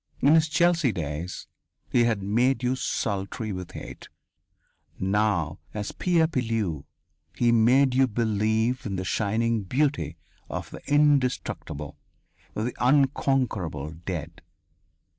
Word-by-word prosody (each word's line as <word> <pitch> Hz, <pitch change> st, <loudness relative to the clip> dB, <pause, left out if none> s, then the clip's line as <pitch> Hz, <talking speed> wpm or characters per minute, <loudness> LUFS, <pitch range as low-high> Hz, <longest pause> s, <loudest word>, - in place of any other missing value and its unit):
In 140 Hz, +3 st, +5 dB
his 160 Hz, -1 st, +4 dB
Chelsea 165 Hz, -3 st, +3 dB
days, 80 Hz, 0 st, -5 dB, 0.5 s
he 120 Hz, -1 st, +4 dB
had 110 Hz, -4 st, 0 dB
made 120 Hz, +6 st, +1 dB
you 125 Hz, +1 st, +1 dB
sultry 105 Hz, -2 st, -2 dB
with 90 Hz, -1 st, -7 dB
hate. -, -, -9 dB, 0.9 s
Now, 95 Hz, -5 st, 0 dB, 0.2 s
as 105 Hz, -1 st, -3 dB
Pierre 170 Hz, -3 st, +2 dB
Pilleux, 115 Hz, -, -2 dB, 0.5 s
he 120 Hz, +5 st, +3 dB
made 125 Hz, +4 st, +4 dB
you 130 Hz, +1 st, +4 dB
believe 110 Hz, +2 st, 0 dB
in 100 Hz, -, -3 dB
the 95 Hz, 0 st, -3 dB
shining 110 Hz, +3 st, 0 dB
beauty 95 Hz, -, -1 dB, 0.3 s
of -, -, -5 dB
the -, -, -9 dB
indestructible, 125 Hz, -, +1 dB, 0.6 s
the 115 Hz, +3 st, -2 dB
unconquerable 125 Hz, -, +1 dB
dead. 80 Hz, -1 st, -6 dB
110 Hz, 115 wpm, -26 LUFS, 95-130 Hz, 0.9 s, In